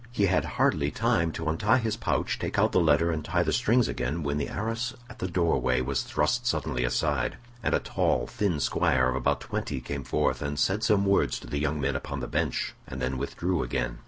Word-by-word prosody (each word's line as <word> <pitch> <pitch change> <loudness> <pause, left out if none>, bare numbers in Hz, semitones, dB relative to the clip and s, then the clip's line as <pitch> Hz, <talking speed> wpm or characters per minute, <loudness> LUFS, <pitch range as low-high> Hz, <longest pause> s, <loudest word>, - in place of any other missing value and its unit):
He 105 -5 +2
had 95 -1 +2
hardly - - +2
time 85 -1 +1
to 80 - -4
untie 105 +10 +3
his 115 -3 -1
pouch, - - -1
take - - -3
out - - +3
the - - +3
letter, 85 +1 +3
and 80 -2 -2
tie 90 +1 +1
the 80 - 0
strings 120 0 +3
again 75 +7 -2
when 70 +1 -1
the 70 - -2
arras 115 +2 -3
at - - -13
the 90 - -2
door 85 -2 +1
way 65 0 +2
was 65 -1 0
thrust - - 0
suddenly 60 0 0
aside, 60 - 0 0.2
and - - +1
a - - +2
tall - - 0
thin 95 -7 -1
squire 65 -1 +2
of 65 - -1
about 65 - 0
twenty 70 - -3
came 70 +1 -5
forth, 65 - 0 0.2
said 95 +8 +1
some 100 -4 +3
words 100 0 +2
to - - -11
the 70 - -3
young 75 +1 -1
men 70 0 0
upon 70 +1 -4
the 60 - -3
bench, - - -1
and 65 - -6
then 65 0 -2
withdrew 90 0 -1
again. - - -2
80 Hz, 220 wpm, -27 LUFS, 65-100 Hz, 0.2 s, untie